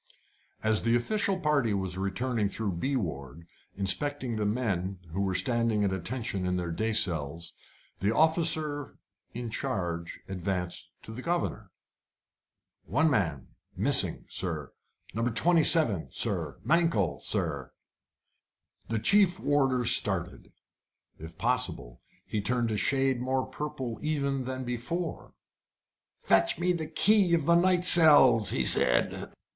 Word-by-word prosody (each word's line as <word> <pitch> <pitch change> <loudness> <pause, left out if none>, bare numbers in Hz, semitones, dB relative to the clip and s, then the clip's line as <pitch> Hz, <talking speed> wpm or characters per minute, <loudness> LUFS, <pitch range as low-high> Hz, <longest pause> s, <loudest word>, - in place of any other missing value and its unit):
As 110 -1 +2
the 115 +1 +1
official 195 - -1
party 140 - 0
was 95 -2 -3
returning 105 +3 -2
through 105 0 -3
B 130 +11 -3
ward, 80 - -6 0.3
inspecting 120 +6 -2
the 105 -1 -2
men, 100 -5 -2
who 95 +4 -3
were 95 -2 -2
standing 115 +2 +1
at 100 -2 0
attention 100 0 -4
in 90 0 -1
their 85 -1 -4
day 110 +7 -2
cells, 85 -5 0 0.5
the 100 - 0
officer 155 0 0 0.4
in 120 -1 -6
charge 85 -10 -4
advanced 90 -1 -4
to - - -9
the 125 - -8
governor. 170 +4 -3 1.2
"One 155 - +1
man 85 - -2 0.3
missing, - - +5
sir! 80 -7 -2 0.4
No. 115 - -3
27, 155 - +5
sir! - - 0
Mankell, 155 - 0
sir!" - - -1 1.2
The 115 - -2
chief 195 - +2
warder 135 -4 0
started. 95 -6 0 0.7
If 80 +1 -11
possible, 120 - -3 0.2
he 105 - -3
turned 120 +2 -1
a 105 - -2
shade 135 +1 0
more 130 +1 -1
purple 130 -6 -6
even 140 -4 -2
than 130 0 -5
before. 125 +9 -5 0.8
"Fetch 95 0 +1
me 180 +1 0
the 160 -3 -5
key 200 -3 +3
of 160 -4 -2
the 170 - +3
night 180 +1 +2
cells," 145 - +6
he 65 - -1
said. - - +2
115 Hz, 130 wpm, -28 LUFS, 95-145 Hz, 1.2 s, cells